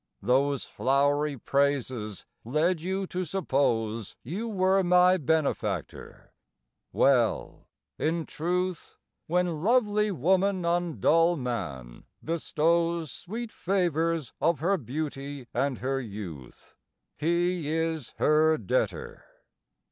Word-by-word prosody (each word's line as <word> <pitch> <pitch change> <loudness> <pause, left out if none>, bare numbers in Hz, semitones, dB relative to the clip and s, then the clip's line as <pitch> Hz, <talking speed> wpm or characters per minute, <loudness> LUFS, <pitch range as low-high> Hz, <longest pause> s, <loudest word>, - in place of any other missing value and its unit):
Those 135 +4 +2
flowery 145 +2 +1
praises 130 -6 -1 0.2
led 155 +7 +1
you 190 +3 -2
to 185 0 -3
suppose 115 - -1
You 190 - -4
were 190 -2 +2
my 180 0 +5
benefactor. 140 - -2 0.6
Well, 125 -5 +1 0.3
in 165 +1 0
truth, 180 +2 -3 0.3
When 175 -2 0
lovely 210 -1 +2
woman 190 +2 +1
on 170 -1 0
dull 165 +2 +4
man 70 - -5 0.2
bestows 165 0 0
Sweet 225 +5 -6
favours 165 - 0
of 165 -4 +2
her 190 +6 +2
beauty 140 0 -5
and 130 +1 0
her 135 +1 -2
youth, 95 - -9 0.4
He 170 0 0
is 160 -3 -2
her 155 +1 +4
debtor. 470 - -2
160 Hz, 100 wpm, -28 LUFS, 135-180 Hz, 0.6 s, my